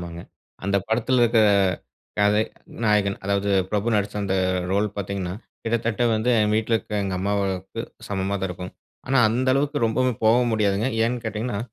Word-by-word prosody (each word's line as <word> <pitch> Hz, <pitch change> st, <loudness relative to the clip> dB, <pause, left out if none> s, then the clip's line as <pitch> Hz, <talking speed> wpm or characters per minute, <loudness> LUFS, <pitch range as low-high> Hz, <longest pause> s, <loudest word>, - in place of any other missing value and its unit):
ஆமாங்க. 85 Hz, -1 st, -7 dB, 0.4 s
அந்த 100 Hz, 0 st, +1 dB
படத்துல 120 Hz, +2 st, +2 dB
இருக்குற 115 Hz, -1 st, +4 dB, 0.8 s
கதை 105 Hz, +1 st, +3 dB, 0.4 s
நாயகன். 105 Hz, -2 st, +2 dB
அதாவது, 100 Hz, 0 st, 0 dB, 0.2 s
பிரபு 110 Hz, +2 st, 0 dB
நடிச்ச 100 Hz, 0 st, -1 dB
அந்த 95 Hz, -1 st, -1 dB, 0.4 s
ரோல் 105 Hz, +2 st, +2 dB
பாத்தீங்கன்னா 95 Hz, -2 st, -3 dB, 0.3 s
கிட்டத்தட்ட 115 Hz, 0 st, 0 dB
வந்து 110 Hz, +3 st, -1 dB
என் 105 Hz, 0 st, +2 dB
வீட்ல 110 Hz, +1 st, +1 dB
இருக்க 105 Hz, -2 st, -3 dB
எங்க 95 Hz, -1 st, -2 dB
அம்மாவுக்கு 95 Hz, -1 st, -2 dB, 0.3 s
சமமா 100 Hz, 0 st, -1 dB
தான் 95 Hz, -, -1 dB
இருக்கும். 90 Hz, +1 st, -7 dB, 0.3 s
ஆனா 135 Hz, +1 st, +2 dB
அந்த 125 Hz, +4 st, 0 dB
அளவுக்கு 145 Hz, +1 st, 0 dB
ரொம்பவும் 125 Hz, +1 st, 0 dB
போகவும் 120 Hz, +2 st, +4 dB
முடியாதுங்க. 105 Hz, +2 st, +1 dB, 0.2 s
ஏன்னு 120 Hz, 0 st, -1 dB
கேட்டீங்கன்னா? 110 Hz, 0 st, -3 dB
105 Hz, 155 wpm, -23 LUFS, 100-115 Hz, 0.8 s, இருக்குற